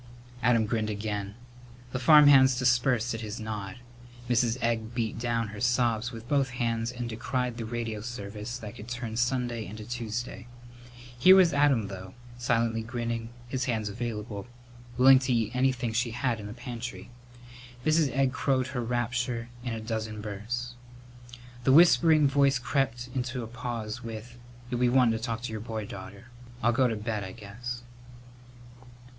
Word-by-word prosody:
Adam 115 -2 +3
grinned 110 0 -1
again. 105 -1 -3 0.6
The 130 - -2
farmhands 135 -2 +7
dispersed 125 -2 +2
at 115 - -4
his 110 0 -5
nod. 105 -3 -5 0.5
Mrs. 120 0 +2
Egg 115 -1 -1
beat 115 -2 -2
down 115 -2 -1
her 105 0 -8
sobs 120 -1 +1
with 115 -1 -9
both 140 -1 +2
hands 115 -1 0
and 120 -1 -5
decried 125 +1 -2
the 115 - -4
radio 115 -2 -3
service 105 0 -6
that 105 -4 -8
could 105 - -9
turn 120 -2 -4
Sunday 120 -1 0
into 110 +1 -8
Tuesday. 120 +1 -4 0.7
Here 185 +8 +9
was 185 -3 +6
Adam, 140 -7 +3
though, 95 -1 -9 0.2
silently 115 -2 +1
grinning, 115 0 -3 0.2
his 130 +1 -2
hands 110 -4 -1
available, 105 -1 -5 0.5
willing 130 +1 +8
to 130 -1 0
eat 115 0 0
anything 125 -3 +1
she 120 +1 +1
had 120 0 -1
in 105 - -7
the 105 - -7
pantry. 120 -4 -7 0.7
Mrs. 155 -2 +3
Egg 130 +1 +1
crowed 130 -2 +1
her 125 -2 -3
rapture 120 0 -2
in 120 -3 -3
a - - -4
dozen 110 -1 -4
bursts. 110 +4 -4 0.9
The 130 - +4
whispering 160 -2 +6
voice 140 -1 +3
crept 125 -1 -1
into 125 -1 -2
a - - -6
pause 120 -1 -5
with, 115 +1 -7 0.4
"You'll 120 - -1
be 125 0 +4
wantin' 120 -3 +4
to - - -11
talk 115 -1 -3
to 125 - -4
your 110 -1 -4
boy, 110 -1 -4
daughter. 100 +3 -10 0.3
I'll 120 - +4
go 130 +1 +3
to 115 - -1
bed, 105 -1 -3
I 95 -1 -7
guess." 120 +3 -7
120 Hz, 160 wpm, -28 LUFS, 110-125 Hz, 0.9 s, Here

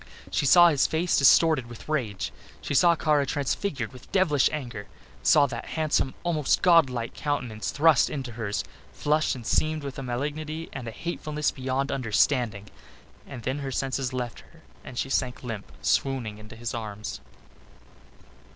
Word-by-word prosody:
She 120 +8 +1
saw 175 +4 +8
his 145 -4 +2
face 165 +2 +1
distorted 140 -1 +5
with 120 -1 -11
rage. 120 -11 -2 0.3
She - - -4
saw 170 +5 +5
Kara 150 -3 +2
transfigured 140 - -2
with 125 - -14
devilish 160 -8 +3
anger, 120 -9 -5 0.3
saw 145 - +5
that 135 - -6
handsome, 155 -4 +1
almost 160 -5 +1
godlike 135 -10 +4
countenance 125 -7 -3
thrust 150 -2 +4
into 135 -5 -5
hers, 110 -3 -3 0.3
flushed 155 0 +1
and 120 -3 -9
seamed 155 +5 +1
with 135 -1 -6
malignity 150 +5 -4
and 125 -3 -6
a - - -4
hatefulness 150 +1 -2
beyond 135 +1 -2
understanding 115 -4 0 0.6
and 125 -4 -8
then 130 +3 -2
her 140 -1 -4
senses 130 0 -1
left 125 -2 -4
her - - -19 0.2
and 125 - -10
she - - -1
sank 130 -2 -1
limp 110 -5 -6
and - - -16
swooning 120 -6 0
into 110 +1 -12
his 120 +2 -5
arms. 105 - -5
135 Hz, 155 wpm, -26 LUFS, 120-150 Hz, 0.6 s, saw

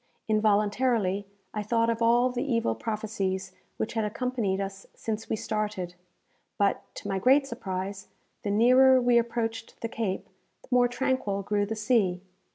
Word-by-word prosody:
Involuntarily, 210 -1 +2 0.3
I 210 - -2
thought 230 +2 +1
of 230 0 -3
all 240 +2 +4
the 245 +1 -2
evil 230 - +1
prophecies 195 - -3 0.3
which - - -2
had 225 -1 0
accompanied 215 -3 -1
us 195 0 -5
since 220 0 -4
we - - +1
started; 210 -5 -3 0.6
but, 200 -1 +2
to - - -7
my 195 -1 -1
great 270 +7 +5
surprise, 195 -5 -5 0.3
the 205 - -3
nearer 255 +5 +6
we 245 -1 +4
approached 230 -1 -3
the 230 - -1
Cape, 220 -4 -3 0.4
the - - -19
more 250 -1 +5
tranquil 245 -5 -1
grew 205 0 0
the 225 - -3
sea. 210 -5 +1
220 Hz, 155 wpm, -28 LUFS, 200-240 Hz, 0.6 s, nearer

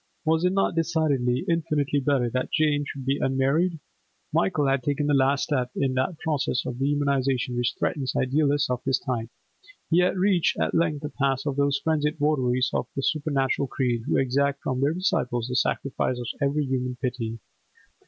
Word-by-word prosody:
Was 160 +1 +2
it 180 +1 +2
not 195 -1 +1
decidedly, 155 -7 0
infinitely 150 -4 0
better 135 -3 +1
that 130 +1 -2
Jane 150 -2 +2
should 135 -2 -7
be 135 +1 0
unmarried? 140 +6 +1 0.5
Michael 140 +10 +2
had 135 -1 +2
taken 145 +2 -1
the 145 - +2
last 135 +1 +3
step 130 -4 0
in 135 -2 0
that 130 +6 -1
process 145 -6 -1
of 125 - -4
dehumanisation 135 -3 0
which 120 -1 0
threatens 135 -4 -1
idealists 145 +1 +1
of 125 - -2
his 130 -1 +2
type. 120 -4 -3 0.6
He 170 - +5
had 180 +1 +2
reached 185 -2 +2
at - - 0
length 155 -3 +1
the 150 - -3
pass 135 -2 -1
of 140 -2 -1
those 140 0 +2
frenzied 155 -1 0
votaries 130 -4 +1
of - - -1
a 135 - -1
supernatural 140 -3 0
creed 120 -2 -1
who - - +2
exact 140 +1 +1
from 130 0 -1
their 145 +4 +2
disciples 125 - 0
the 125 - -4
sacrifice 130 0 0
of 120 - -5 0.2
every 140 +1 +1
human 125 -1 -2
piety. 115 -2 -3
140 Hz, 180 wpm, -25 LUFS, 130-150 Hz, 0.6 s, He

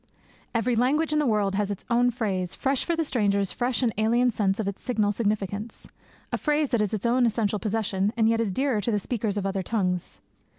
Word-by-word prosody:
Every 230 +2 +1
language 290 +7 +2
in 305 - +3
the 295 - +1
world 210 -3 +1
has 205 0 0
its 200 - -5
own 245 +1 +3
phrase, 195 -7 -2
fresh 270 -1 0
for 340 - 0
the 325 - 0
stranger's 200 - +1
fresh 245 0 -1
and 230 -3 +1
alien 240 +3 +3
sense 200 -2 0
of 215 - -1
its 200 - -4
signal 215 -5 +1
significance; 210 0 -3 0.4
a - - -1
phrase 300 -1 +1
that 235 - +2
is 210 - 0
its 215 +1 -3
own 240 +1 +3
essential 215 -2 0
possession, 205 -2 0
and 220 -1 +4
yet 230 0 +2
is 215 -4 -1
dearer 255 0 0
to 220 - -2
the 210 - +2
speaker 220 +2 -3
of 200 -1 -1
other 195 0 -1
tongues. 180 -3 -2
220 Hz, 220 wpm, -26 LUFS, 200-245 Hz, 0.4 s, and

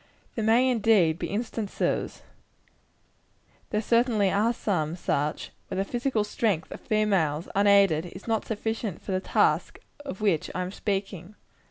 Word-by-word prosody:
There 225 - -3
may, 230 +4 +4
indeed, 210 -9 +3
be - - -2
instances 220 -1 -2 1.5
there 210 +1 -1
certainly 230 -4 +2
are 215 +4 +2
some 170 -9 -1
such 150 -3 -2 0.2
where - - -5
the 190 - +1
physical 240 -1 -1
strength 210 -5 -1
of - - -8
females, 190 -8 +1
unaided, 200 -5 +4
is 185 +5 -11
not 225 -2 0
sufficient 220 -3 -3
for - - -5
the 185 - +1
task - - +1 0.3
of 275 -10 -7
which 200 -7 +1
I 185 - -1
am 180 - -5
speaking. 195 -2 -4
205 Hz, 145 wpm, -27 LUFS, 185-225 Hz, 1.5 s, may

